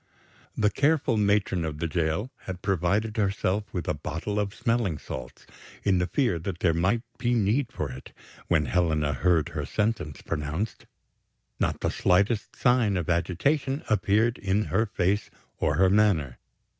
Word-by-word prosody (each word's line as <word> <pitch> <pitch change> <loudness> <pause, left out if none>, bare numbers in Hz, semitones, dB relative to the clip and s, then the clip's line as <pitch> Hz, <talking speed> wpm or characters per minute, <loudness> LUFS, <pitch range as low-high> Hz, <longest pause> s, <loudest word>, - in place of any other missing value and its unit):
The 105 -1 +3
careful 145 -1 +2
matron 100 -4 +2
of 80 -2 -3
the 85 - -2
jail 85 - -1
had 90 -1 -6
provided 100 +4 0
herself 100 0 0
with 90 - -4
a - - +1
bottle 85 +7 -3
of 100 -1 -2
smelling 115 -9 0
salts, - - -8 0.4
in 95 -3 +3
the 90 - 0
fear 120 - +1
that 85 +1 -4
there 85 -3 +3
might 95 +8 +1 0.2
be 120 -1 +1
need 115 +4 +1
for 75 -4 -4
it 65 +1 -10 0.4
when 80 -4 +2
Helena 80 -3 +1
heard 80 +2 +2
her - - -4
sentence 105 -9 -2
pronounced. 75 +9 -3 0.7
Not - - 0
the - - 0
slightest 100 +5 +1
sign 125 -6 +3
of 85 -1 -1
agitation 135 - 0
appeared 110 +3 +2
in 100 +2 +1
her 110 0 +2
face 100 +1 0 0.3
or 75 - +1
her 95 +3 +4
manner. 95 - +2
95 Hz, 155 wpm, -27 LUFS, 85-110 Hz, 0.7 s, her